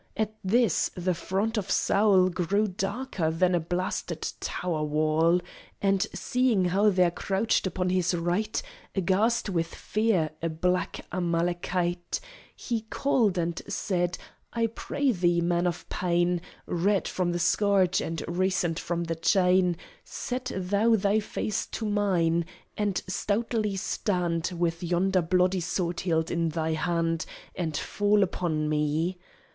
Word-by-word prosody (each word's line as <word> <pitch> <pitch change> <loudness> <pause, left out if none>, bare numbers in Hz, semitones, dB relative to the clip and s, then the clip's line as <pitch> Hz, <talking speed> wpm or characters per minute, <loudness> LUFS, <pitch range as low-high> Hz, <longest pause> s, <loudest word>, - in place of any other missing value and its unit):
At 215 0 0
this 220 0 +2
the 180 0 0
front 200 +6 -1
of 200 -1 -6
Saul 195 -3 +4
Grew 185 +4 +1
darker 195 -1 -2
than 180 +3 +2
a 175 - +3
blasted 175 +3 -3
tower 170 -4 -2
wall; 155 +3 +2 0.4
And 195 +1 +2
seeing 245 -7 +1
how 195 +4 +3
there 180 -3 +3
crouched 195 +3 0
upon 180 -1 -1
his 180 -1 +1
right, 175 +6 0 0.4
Aghast 205 +6 +2
with 170 -4 0
fear, 210 -8 +1
a 165 - 0
black 180 +3 -1
Amalekite, 175 0 -1 0.4
He 235 -3 -2
called, 230 -9 +2
and 170 -1 -1
said: 175 -3 -1 0.3
"I 230 -1 +1
pray 265 +4 -1
thee, 175 -4 +2
man 175 +1 +1
of 175 0 -4
pain, 175 -1 +1 0.2
Red 195 +3 +1
from 180 -2 -1
the 175 - -1
scourge, 190 +1 +3
and 165 0 -3
recent 180 -1 0
from 170 0 -2
the 165 0 -2
chain, 180 +1 +3 0.3
Set 250 0 -4
thou 200 +5 +2
thy 205 +1 +2
face 210 0 -3
to 225 - -4
mine, 175 -5 +2 0.3
and 205 -3 0
stoutly 215 -1 -1
stand 180 -3 -1
With 170 -1 0
yonder 180 +2 +2
bloody 180 +2 +2
sword 170 0 -2
hilt 160 -3 0
in 170 -1 +1
thy 160 0 -1
hand, 165 0 0 0.3
And 160 -4 -2
fall 205 0 +2
upon 160 -4 -1
me." 155 +4 0
180 Hz, 135 wpm, -27 LUFS, 170-200 Hz, 0.4 s, Saul